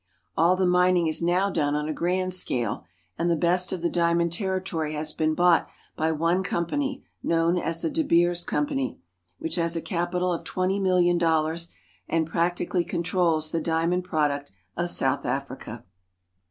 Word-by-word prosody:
All 170 +3 +4
the 185 0 +1
mining 180 -1 +3
is 155 0 +1
now 175 +3 +2
on 145 -3 +1
a 155 - -2
grand 185 +3 0
scale; 120 - -1 0.3
and 170 - +1
the 170 - +3
best 175 +3 +1
of 185 - -3
the 170 - +2
diamond 170 -1 +2
ter 190 +1 -1
ritory 160 -5 -3
has 155 0 -1
been 155 0 0
bought 175 -1 +4 0.3
by 160 +1 0
one 165 +4 +1
com 170 -2 -1
pany, 275 - -2 0.2
known 170 +1 +2
as 165 -1 -3
the 165 - +1
De - - 0
Beers 175 - +2
Company, 140 -5 -2 0.4
which 165 +2 -3
has 170 0 0
a - - 0
capital 180 +1 -1
of 165 - -4
twenty 185 +2 -1
milUon 180 -2 +3
dollars, 165 0 +1 0.4
and 160 -1 +1
practi 175 +1 0
cally 180 -2 +1
controls 170 -3 0
the 165 - -1
diamond 165 +3 0
product 145 -5 -1 0.2
of 175 +1 -1
South 135 -3 0
Africa. 135 -4 -5
170 Hz, 175 wpm, -26 LUFS, 160-180 Hz, 0.4 s, All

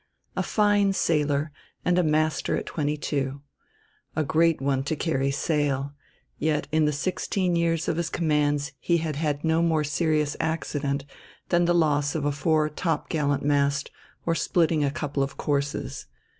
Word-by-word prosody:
A - - 0
fine 205 -2 +2
sailor, 150 -4 +1 0.3
and 180 +1 +3
a - - +3
master 155 0 +1
at - - -4
twenty 150 -1 -2
two. 140 -1 -2 0.7
A 155 - +1
great 165 +2 +2
one 135 -1 +1
to 160 - -1
carry 140 -4 0
sail; 140 -1 0 0.5
yet 150 0 0
in 155 0 +3
the 150 - +2
sixteen 180 +4 -1
years 165 -1 +1
of 160 - 0
his 170 -1 -1
commands 145 -4 +1
he 170 - +2
had 155 -3 -3
had 150 -2 -1
no 160 0 +2
more 160 -2 +2
serious 150 0 0
accident 145 -3 -2 0.4
than 175 0 +3
the 175 0 +3
loss 150 -3 +2
of 150 -3 -1
a 145 - +2
fore 155 +1 +2
topgallant 150 -2 -1
mast 140 0 +1 0.3
or 165 - +2
splitting 165 -2 +2
a 140 - +2
couple 145 0 -3
of 135 0 -2
courses. 140 -1 -2
150 Hz, 160 wpm, -26 LUFS, 145-165 Hz, 0.7 s, and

